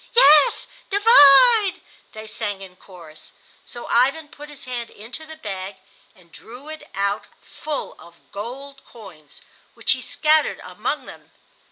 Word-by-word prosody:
"Yes; 300 Hz, -, +5 dB, 0.2 s
divide!" 410 Hz, -, +6 dB, 0.3 s
they 215 Hz, 0 st, -9 dB
sang 210 Hz, -2 st, -5 dB
in 185 Hz, -1 st, -13 dB
chorus. 170 Hz, -5 st, -13 dB, 0.3 s
So 240 Hz, -, -9 dB
Ivan 275 Hz, +6 st, +1 dB
put 295 Hz, 0 st, -13 dB
his 295 Hz, -2 st, -11 dB
hand 245 Hz, -2 st, -6 dB
into 240 Hz, +9 st, -8 dB
the 315 Hz, -, -10 dB
bag 195 Hz, -5 st, -7 dB, 0.4 s
and 170 Hz, -2 st, -24 dB
drew 250 Hz, -, -13 dB
it 310 Hz, -1 st, -10 dB
out 200 Hz, +1 st, -2 dB, 0.2 s
full 300 Hz, -2 st, -6 dB
of 170 Hz, 0 st, -19 dB
gold 270 Hz, +7 st, -8 dB
coins, 180 Hz, -, -16 dB, 0.3 s
which -, -, 0 dB
he -, -, +1 dB
scattered 310 Hz, 0 st, +1 dB
among -, -, -5 dB
them. -, -, -14 dB
245 Hz, 140 wpm, -21 LUFS, 200-305 Hz, 0.4 s, divide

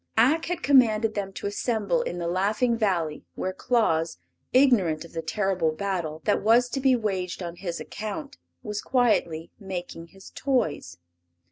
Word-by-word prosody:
Ak 270 Hz, +9 st, +4 dB
had 350 Hz, 0 st, -3 dB
commanded 225 Hz, -5 st, +4 dB
them 200 Hz, -2 st, -3 dB
to -, -, -7 dB
assemble 220 Hz, +3 st, 0 dB
in 175 Hz, -, -4 dB
the 170 Hz, -1 st, -3 dB
Laughing 210 Hz, +7 st, +1 dB
Valley, 175 Hz, -9 st, -1 dB
where 185 Hz, -, -3 dB
Claus, 170 Hz, -, +1 dB, 0.3 s
ignorant 210 Hz, -, +3 dB
of 170 Hz, -, -15 dB
the 165 Hz, -, -3 dB
terrible 185 Hz, -1 st, 0 dB
battle 165 Hz, -3 st, -3 dB
that 210 Hz, -, +2 dB
was 235 Hz, +3 st, +4 dB
to 270 Hz, -, -2 dB
be 265 Hz, -1 st, +4 dB
waged 190 Hz, -5 st, -2 dB
on 170 Hz, 0 st, -6 dB
his 175 Hz, -3 st, -4 dB
account, 275 Hz, +7 st, -6 dB, 0.2 s
was 210 Hz, -3 st, -4 dB
quietly 175 Hz, -10 st, +1 dB
making 180 Hz, -4 st, -6 dB
his 195 Hz, +3 st, -15 dB
toys. 160 Hz, -, -1 dB
200 Hz, 155 wpm, -26 LUFS, 170-240 Hz, 0.3 s, Ak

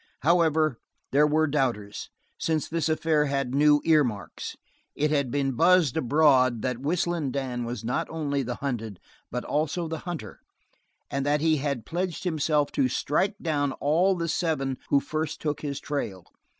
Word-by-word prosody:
However, 160 Hz, -5 st, +3 dB, 0.3 s
there 150 Hz, +2 st, +5 dB
were 155 Hz, +1 st, +3 dB
doubters, 125 Hz, -9 st, -2 dB, 0.3 s
since 160 Hz, -3 st, 0 dB
this 165 Hz, 0 st, -1 dB
affair 155 Hz, -1 st, +2 dB
had 135 Hz, -3 st, -1 dB
new 145 Hz, +1 st, +5 dB
earmarks. 140 Hz, -11 st, 0 dB, 0.4 s
It 150 Hz, +1 st, +1 dB
had 140 Hz, -4 st, +1 dB
been 135 Hz, +1 st, 0 dB
buzzed 165 Hz, 0 st, +4 dB
abroad 130 Hz, -5 st, +3 dB
that 125 Hz, -2 st, -1 dB
Whistling 165 Hz, 0 st, 0 dB
Dan 125 Hz, -2 st, -3 dB
was 115 Hz, -1 st, -5 dB
not 120 Hz, +2 st, -1 dB
only 145 Hz, -3 st, -1 dB
the 125 Hz, -1 st, -3 dB
hunted, 115 Hz, -8 st, -4 dB, 0.3 s
but 125 Hz, 0 st, -4 dB
also 160 Hz, +3 st, -1 dB
the 160 Hz, 0 st, -4 dB
hunter, 160 Hz, -, -7 dB, 0.7 s
and 140 Hz, 0 st, -1 dB
that 145 Hz, +1 st, +1 dB
he 160 Hz, -1 st, +3 dB
had 140 Hz, -4 st, -2 dB
pledged 175 Hz, 0 st, -3 dB
himself 155 Hz, -4 st, +1 dB
to 130 Hz, -, +2 dB
strike 170 Hz, -, 0 dB
down 145 Hz, -4 st, 0 dB
all 170 Hz, +9 st, +2 dB
the 170 Hz, -1 st, -2 dB
seven 155 Hz, -5 st, -1 dB
who 140 Hz, -, +5 dB
first 155 Hz, +2 st, -3 dB
took 150 Hz, -1 st, -2 dB
his 140 Hz, -2 st, -3 dB
trail. 105 Hz, -, -4 dB
145 Hz, 160 wpm, -26 LUFS, 130-160 Hz, 0.7 s, there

